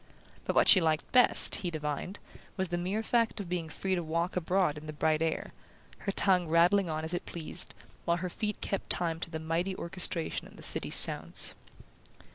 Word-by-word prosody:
But - - -2
what - - +4
she 185 - +8
liked 160 -1 -1
best, 250 -1 +5
he 180 - -4
divined, 155 +4 -4 0.4
was 190 -2 -2
the 175 - -2
mere 195 +5 -2
fact 230 -1 0
of 195 -4 -6
being 175 -3 -3
free 190 +4 -3
to 180 - 0
walk 170 +2 -2
abroad 180 -2 +1
in 155 - -12
the 155 - -6
bright 155 +1 0
air, 165 -1 -2 0.5
her 200 - -3
tongue 185 -3 +2
rattling 175 +3 +3
on 155 0 -3
as 160 - -1
it 175 - -4
pleased, 170 +1 -4 0.3
while 170 0 +1
her 180 +1 -4
feet 210 +2 -4
kept 195 - -4
time 165 -2 0
to 170 - -4
the 160 - -5
mighty 165 +4 -2
orchestration 170 -2 -2
of - - -17
the - - -12
city's - - +3
sounds. - - +3
175 Hz, 200 wpm, -30 LUFS, 160-190 Hz, 0.5 s, she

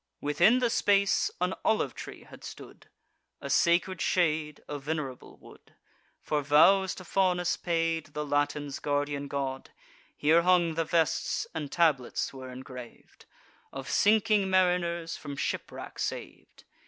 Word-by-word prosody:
Within 170 - +3
the 245 -2 +1
space, 200 -4 +2
an 180 +1 0
olive 220 - +1
tree - - -9
had - - -15
stood, - - -11 0.5
A - - -5
sacred 175 +1 +2
shade, 155 -4 0
a 145 -1 -5
venerable 140 -3 -5
wood, - - -18 0.4
For 150 -1 -1
vows 180 +7 +4
to 185 - -10
Faunus 180 -2 +1
paid, 165 -2 -1
the 150 0 -2
Latins' 145 0 -1
guardian 145 0 -2
god. 135 -2 -4 0.5
Here 160 +3 +4
hung 175 -2 +3
the 165 0 -1
vests, 165 -1 0
and 150 -3 -5
tablets 150 -9 +1
were 130 -1 -9
engrav'd, 125 -1 -11 0.5
Of 135 0 -7
sinking 210 -1 +3
mariners 175 -3 +1
from 145 -2 -7
shipwreck - - -5
sav'd. - - -6
160 Hz, 130 wpm, -29 LUFS, 145-180 Hz, 0.5 s, vows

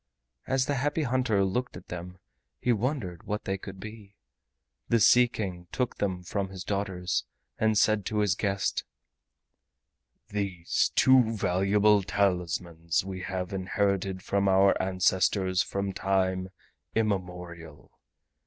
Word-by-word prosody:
As 130 -1 +2
the 145 - -1
Happy 145 +4 0
Hunter 125 -6 +1
looked 125 +3 -2
at 90 - -14
them 90 +1 -7 0.4
he 125 - +2
wondered 110 - -2
what 105 +1 -2
they 95 - -1
could 95 0 -9
be. 105 -1 -10 0.7
The 115 - +4
Sea 125 +3 +6
King 90 -6 -5
took 125 -2 -2
them 95 -3 -2
from 95 +2 -3
his 95 -1 -7
daughters 95 -3 -2 0.3
and 110 -1 +2
said 110 0 +3
to 110 - -2
his 105 -3 +3
guest: 100 0 -1 1.5
"These 100 -4 0
two 125 -4 +5
valuable 100 +3 +3
talismans 90 -4 -1
we 95 -1 -5
have 95 0 -4
inherited 95 0 -1
from 100 0 +1
our 95 +1 +5
ancestors 95 0 +2
from 100 +1 -3
time 95 -1 0 0.5
immemorial. 90 -7 -3
95 Hz, 125 wpm, -28 LUFS, 90-105 Hz, 1.5 s, Sea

